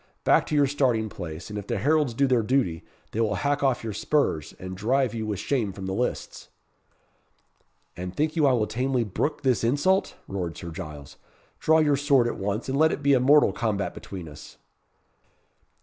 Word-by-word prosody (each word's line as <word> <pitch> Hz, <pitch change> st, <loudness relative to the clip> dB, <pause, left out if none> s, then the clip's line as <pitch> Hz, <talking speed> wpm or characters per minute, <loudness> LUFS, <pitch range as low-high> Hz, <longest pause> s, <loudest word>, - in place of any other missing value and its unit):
Back -, -, +3 dB
to 155 Hz, -, -1 dB
your 145 Hz, -1 st, +5 dB
starting 125 Hz, -6 st, +1 dB
place, 85 Hz, 0 st, -7 dB
and 105 Hz, -, -4 dB
if 100 Hz, -, -9 dB
the 120 Hz, -, -1 dB
heralds 145 Hz, +2 st, +1 dB
do 140 Hz, -, +3 dB
their 125 Hz, -3 st, +3 dB
duty, 110 Hz, -8 st, 0 dB, 0.3 s
they 115 Hz, -, -1 dB
will 105 Hz, -2 st, +1 dB
hack 145 Hz, +8 st, 0 dB
off 135 Hz, -4 st, +1 dB
your 110 Hz, -2 st, -4 dB
spurs, 100 Hz, -, 0 dB
and 95 Hz, 0 st, -7 dB
drive 125 Hz, +5 st, +1 dB
you 110 Hz, -2 st, -3 dB
with 105 Hz, -2 st, -2 dB
shame 110 Hz, 0 st, -1 dB
from 95 Hz, 0 st, -8 dB
the 95 Hz, -, -3 dB
lists." 125 Hz, +5 st, -3 dB, 1.5 s
"And 90 Hz, +1 st, -6 dB
think 155 Hz, +2 st, 0 dB
you 155 Hz, -3 st, +3 dB
I 135 Hz, -, +4 dB
will 115 Hz, -4 st, +2 dB
tamely 125 Hz, +2 st, 0 dB
brook 145 Hz, -, -2 dB
this 130 Hz, -3 st, +2 dB
insult?" 145 Hz, +11 st, +1 dB
roared 90 Hz, -4 st, -4 dB
Sir 85 Hz, -, -7 dB
Giles; 75 Hz, -4 st, -9 dB, 0.4 s
"draw 160 Hz, 0 st, +4 dB
your 150 Hz, -3 st, +3 dB
sword 140 Hz, -3 st, +3 dB
at 120 Hz, -, -3 dB
once, 100 Hz, +3 st, -2 dB
and 135 Hz, +1 st, -1 dB
let 160 Hz, +1 st, +5 dB
it 145 Hz, -, -4 dB
be 140 Hz, 0 st, +4 dB
a 130 Hz, -, +5 dB
mortal 145 Hz, +4 st, +5 dB
combat 105 Hz, -4 st, -2 dB
between 90 Hz, -4 st, -8 dB
us." 75 Hz, -, -12 dB
120 Hz, 195 wpm, -26 LUFS, 100-140 Hz, 1.5 s, your